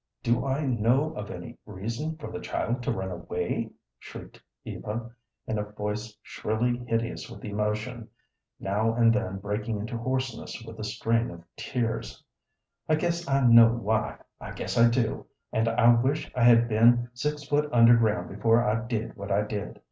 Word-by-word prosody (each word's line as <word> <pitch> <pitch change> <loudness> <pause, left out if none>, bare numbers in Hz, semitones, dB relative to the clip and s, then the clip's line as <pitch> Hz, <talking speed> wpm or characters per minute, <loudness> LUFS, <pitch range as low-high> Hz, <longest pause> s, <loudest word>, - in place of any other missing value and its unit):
"Do 120 +3 +1
I 140 +3 0
know 130 +5 +2
of 105 -8 -6
any 120 0 -8
reason 115 +10 -4
for 155 - -8
the - - -5
child 120 +3 -2
to 120 - -1
run 95 0 -3
away?" 85 - -3 0.3
shrieked - - -11 0.2
Eva, 115 +2 -5 0.3
in 110 - -2
a - - -1
voice 105 +1 -4
shrilly 120 +3 -1
hideous 115 0 -2
with - - -10
emotion, 110 +3 -3 0.5
now 110 +4 0
and 115 -1 +5
then 110 -6 -1
breaking 105 +3 -3
into 115 +3 -4
hoarseness 130 -1 -3
with 115 -1 -10
the 110 - -5
strain 115 +2 0
of 85 -1 -10
tears. 115 - -3 0.7
"I 155 - +5
guess 170 +1 -2
I 135 -1 +3
know 115 -1 +8
why, 110 -1 -1 0.2
I - - -8
guess - - -4
I 115 0 +6
do, 115 -1 -1 0.3
and 110 +1 +1
I 120 +1 +5
wish 130 +6 0
I 120 -2 +2
had 120 -1 +6
been 120 +2 +4
six 150 +4 -3
foot 145 +1 0
under 120 0 +7
ground 105 -6 +1
before 115 +3 +3
I 110 +2 +1
did 115 -2 -3
what 100 0 -7
I 100 +2 +3
did. 105 -1 -5
115 Hz, 170 wpm, -27 LUFS, 105-125 Hz, 0.7 s, know